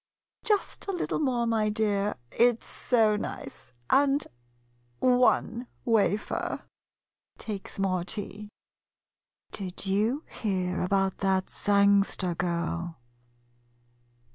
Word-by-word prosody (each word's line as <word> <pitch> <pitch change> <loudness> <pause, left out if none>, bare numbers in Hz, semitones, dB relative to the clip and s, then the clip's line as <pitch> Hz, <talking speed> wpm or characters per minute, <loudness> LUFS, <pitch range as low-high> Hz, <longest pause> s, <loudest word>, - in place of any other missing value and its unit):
Just 415 -1 0
a - - 0
little 360 - -2
more, 250 -5 +1
my 220 -2 +1
dear, 210 -1 0
— 120 - -38
it 240 -1 +3
's - - -14
so 220 -4 +2
nice, 210 - -6
— 120 - -34
and 280 +1 +4 0.7
one 250 - +2 0.2
wafer. 215 -2 0 0.7
[Takes 205 -3 -6
more 185 -2 0
tea.] 205 +2 -4 1.0
Did 190 -1 -5
you 215 +10 +1
hear 185 -4 -2
about 195 +1 +1
that 190 -1 +1
Sangster 200 -2 +3
girl? 170 -1 -2
205 Hz, 105 wpm, -28 LUFS, 190-235 Hz, 1.0 s, and